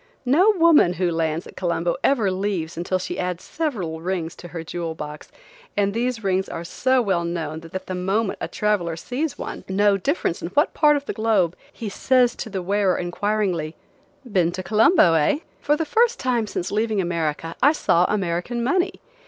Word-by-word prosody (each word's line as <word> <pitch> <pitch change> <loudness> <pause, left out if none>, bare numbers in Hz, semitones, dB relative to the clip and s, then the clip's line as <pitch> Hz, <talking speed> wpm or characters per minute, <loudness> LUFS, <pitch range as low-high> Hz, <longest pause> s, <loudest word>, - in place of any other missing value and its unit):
No 320 +12 +5
woman 325 - +5
who 180 0 0
lands 165 0 -1
at - - -12
Colombo 170 -1 -1
ever 225 -8 +3
leaves 185 -4 -2
until 175 +3 -1
she 185 - -5
adds 180 -1 -3
several 195 - -3
rings 175 -2 -3
to 175 - -9
her 165 -1 -6
jewel 165 0 -4
box, 150 -1 -8 0.5
and 200 -1 +2
these 235 0 -1
rings 190 -1 0
are 165 - -5
so 255 +8 +1
well 190 -5 +1
known 165 -2 -3
that 165 +3 -7
the 185 - -5
moment 195 +4 -1
a - - -2
traveler 200 -6 0
sees 255 - -3
one, - - -6
no 200 +1 +3
difference 235 - -1
in - - -3
what 295 - +3
part 300 -1 +4
of 285 -1 -3
the - - -3
globe, 210 -6 +1 0.2
he 225 - -7
says 245 +4 +2
to - - -5
the 190 -3 -4
wearer, 195 0 +1
inquiringly: 180 -3 -1 0.5
"Been 185 -8 +1
to 185 - -4
Colombo, 215 - +5
eh?" 160 - +3 0.2
For 295 - +2
the 325 - -1
first 470 +9 +2
time 240 -4 0
since 180 - -4
leaving 215 0 0
America 165 -2 -2
I 285 - +6
saw 180 - +2
American 195 +4 -1
money. 360 +9 +1
190 Hz, 185 wpm, -23 LUFS, 170-235 Hz, 0.5 s, I